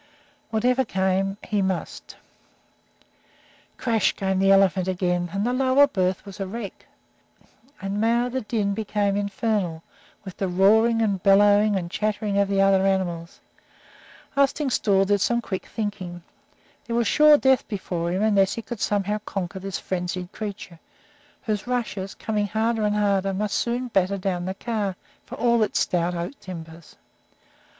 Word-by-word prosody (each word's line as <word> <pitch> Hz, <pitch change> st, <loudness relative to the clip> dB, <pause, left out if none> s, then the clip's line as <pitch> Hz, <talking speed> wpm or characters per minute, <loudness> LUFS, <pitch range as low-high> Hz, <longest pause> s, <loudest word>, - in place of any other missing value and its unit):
Whatever 245 Hz, +4 st, +2 dB
came, 195 Hz, -2 st, 0 dB
he 210 Hz, -2 st, -1 dB
must 190 Hz, -2 st, -4 dB, 1.6 s
Crash! 225 Hz, -4 st, +1 dB
came 190 Hz, -1 st, -1 dB
the 195 Hz, 0 st, +3 dB
elephant 195 Hz, -1 st, +4 dB
again, 180 Hz, -1 st, -1 dB
and 200 Hz, +3 st, -1 dB
the 245 Hz, -, 0 dB
lower 265 Hz, +2 st, +4 dB
berth 185 Hz, -9 st, -1 dB
was 200 Hz, -1 st, -10 dB
a 195 Hz, -, -3 dB
wreck. 205 Hz, 0 st, -7 dB, 0.9 s
And 195 Hz, +2 st, -3 dB
now 235 Hz, +2 st, +2 dB
the 260 Hz, +1 st, -3 dB
din 210 Hz, -3 st, -1 dB
became 205 Hz, -1 st, -1 dB
infernal 200 Hz, -4 st, -1 dB, 0.4 s
with 190 Hz, -, -9 dB
the 195 Hz, -, -1 dB
roaring 220 Hz, +5 st, +4 dB
and 200 Hz, -4 st, 0 dB
bellowing 205 Hz, +2 st, +5 dB
and 175 Hz, -2 st, -3 dB
chattering 210 Hz, -1 st, -1 dB
of 200 Hz, -, +3 dB
the 195 Hz, 0 st, 0 dB
other 195 Hz, -1 st, +4 dB
animals. 175 Hz, -3 st, -1 dB, 0.9 s
Arstingstall 265 Hz, -8 st, +2 dB
did 205 Hz, 0 st, +1 dB
some 235 Hz, +3 st, +2 dB
quick 195 Hz, -5 st, -5 dB
thinking. 185 Hz, -5 st, -5 dB, 0.6 s
There 235 Hz, -, -2 dB
was 235 Hz, 0 st, +2 dB
sure 300 Hz, +6 st, +6 dB
death 265 Hz, -2 st, +2 dB
before 175 Hz, -5 st, -3 dB
him, 185 Hz, +3 st, 0 dB
unless 200 Hz, -3 st, +3 dB
he 230 Hz, -, -5 dB
could 240 Hz, -1 st, -7 dB
somehow 205 Hz, +1 st, 0 dB
conquer 190 Hz, -2 st, -5 dB
this 195 Hz, 0 st, -4 dB
frenzied 180 Hz, 0 st, -4 dB
creature, 200 Hz, -5 st, -7 dB, 0.6 s
whose 210 Hz, 0 st, -2 dB
rushes, 220 Hz, -6 st, -3 dB
coming 210 Hz, -2 st, -2 dB
harder 220 Hz, +2 st, 0 dB
and 210 Hz, 0 st, +1 dB
harder, 195 Hz, -2 st, +1 dB
must 210 Hz, +1 st, -1 dB
soon 245 Hz, +1 st, -1 dB
batter 195 Hz, -2 st, +1 dB
down 180 Hz, -2 st, -2 dB
the 190 Hz, +1 st, -3 dB
car, 210 Hz, -4 st, -2 dB, 0.3 s
for -, -, -7 dB
all 235 Hz, 0 st, +2 dB
its 210 Hz, -, +1 dB
stout 175 Hz, 0 st, 0 dB
oak 175 Hz, +11 st, -5 dB
timbers. 165 Hz, -3 st, -10 dB
200 Hz, 150 wpm, -24 LUFS, 190-220 Hz, 1.6 s, sure